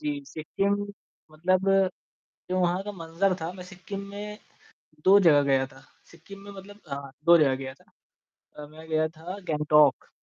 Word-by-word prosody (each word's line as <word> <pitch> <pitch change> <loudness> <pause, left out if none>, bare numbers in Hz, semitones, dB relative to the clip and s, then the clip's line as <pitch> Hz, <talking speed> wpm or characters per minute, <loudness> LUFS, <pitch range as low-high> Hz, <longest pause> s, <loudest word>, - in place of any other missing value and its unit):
जी, 295 -1 -3
सिक्किम 195 - -1 0.6
मतलब 185 +4 +1 0.8
जो 185 - +1
वहाँ 180 +2 +1
का 205 - -5
मंजर 175 +2 -1
था, 165 +2 -4
मैं 180 -1 -10
सिक्किम 195 +2 -8
में 210 +1 -7 0.7
2 195 +2 +8
जगह 150 -6 +6
गया 135 -1 +2
था। 135 0 -17 0.3
सिक्किम 185 +4 -13
में 200 - -9
मतलब 200 +1 -12
हाँ, 140 -1 -6
2 170 0 +7
जगह 140 -4 +4
गया 130 0 -7
था। - - -27 0.7
अ, 150 0 -8
मैं 160 +1 -13
गया 155 0 +2
था 165 +4 -9
गंगटोक। 150 -1 +3
170 Hz, 165 wpm, -27 LUFS, 150-195 Hz, 0.8 s, 2